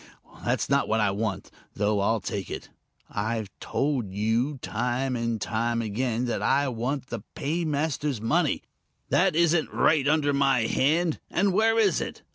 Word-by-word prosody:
That's - - 0
not - - +2
what 110 - +1
I 105 -2 +2
want 100 -1 -3 0.2
though 105 0 +1
I'll 110 +2 +1
take 100 -2 -4
it. - - -6 0.4
I've 110 0 -3
told 135 -8 -1
you, 115 +8 0
time 125 +2 -1
and 115 -1 -1 0.4
again, 115 +2 -1
that 120 - -2
I 140 0 +2
want 125 +3 -3
the 120 -3 -4
paymaster's 150 -3 -1
money. 150 +8 +1 0.5
That - - +3
isn't 170 -1 +3
right 150 -3 +3
under 145 -1 +2
my 135 -3 +3
hand 155 +8 +1
and 195 +1 +1
where 225 +3 +3
is 205 -6 +3
it? - - -6
130 Hz, 150 wpm, -26 LUFS, 110-150 Hz, 0.5 s, That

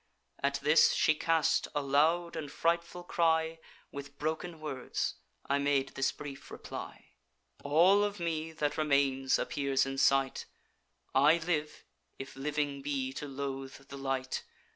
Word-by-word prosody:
At 140 0 +1
this, 150 +2 +6
she 155 - +4
cast 160 +1 +2
a 145 - +1
loud 160 +5 +2
and 150 -3 -5
frightful 170 +1 -1
cry. 165 -2 +1 0.3
With 140 0 -8
broken 160 +2 -3
words 145 -5 -3 0.3
I 140 +1 +2
made 140 -1 +1
this 135 - 0
brief 140 -2 -9
reply: - - -8 0.5
'All 175 +8 +5
of 205 -1 -2
me 160 -1 -2
that 150 -1 -2
remains 140 -3 +2
appears 135 -2 0
in 135 0 -3
sight; 135 -1 +2 0.7
I 145 +5 +6
live, 165 -3 -2 0.3
if 135 - -8
living 145 0 -2
be 135 -2 -2
to 145 - -5
loathe 135 0 -6
the 140 - -7
light. 135 -1 -2
145 Hz, 140 wpm, -31 LUFS, 135-160 Hz, 0.7 s, this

